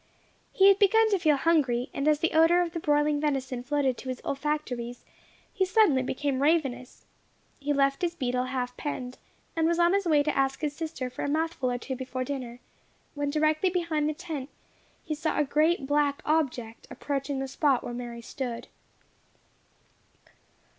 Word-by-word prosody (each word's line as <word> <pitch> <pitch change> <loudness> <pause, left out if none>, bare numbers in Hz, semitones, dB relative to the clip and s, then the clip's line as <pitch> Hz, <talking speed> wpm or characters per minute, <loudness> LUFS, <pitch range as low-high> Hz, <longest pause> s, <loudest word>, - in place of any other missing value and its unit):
He 390 - +5
had 395 0 +6
begun 440 +2 +4
to 395 - +2
feel 310 -3 +3
hungry; 270 -6 +1
and 280 - -2
as 300 0 +3
the 330 - +1
odour 325 +2 +5
of 345 -1 -1
the 335 - -4
broiling 295 -1 +1
venison 265 -4 -1
floated 270 -1 0
to 260 - -7
his 255 - -4
olfactories, 270 -4 -3 0.5
he 390 - +1
suddenly 370 -8 +4
became 265 +1 -2
ravenous. 275 -5 0 0.5
He 290 0 -2
left 275 -1 +2
his 345 -1 -1
beetle 250 -4 -1
half 250 -1 -3
penned, 255 -4 -5 0.4
and 325 -1 +2
was 340 0 +1
on 345 +1 +4
his 395 -2 +1
way 300 -3 +4
to 300 - -1
ask 270 +1 0
his 295 -2 -2
sister 310 -6 -4
for - - -5
a - - -1
mouthful 315 -3 -1
or 245 - -1
two 260 +2 -5
before 255 0 -4
dinner, 250 -3 -5 0.5
when 290 -1 -2
directly 310 +4 +2
behind 335 -4 0
the 305 - -3
tent 300 -5 -6 0.5
he 310 - -3
saw 310 +1 -2
a - - +3
great 305 +2 +1
black 290 0 +1
object 255 -7 -1
approaching 280 -1 -3
the 270 0 -3
spot 270 -1 +1
where 240 - -5
Mary 240 -1 -6
stood. 245 -2 -5
290 Hz, 175 wpm, -27 LUFS, 260-320 Hz, 0.5 s, had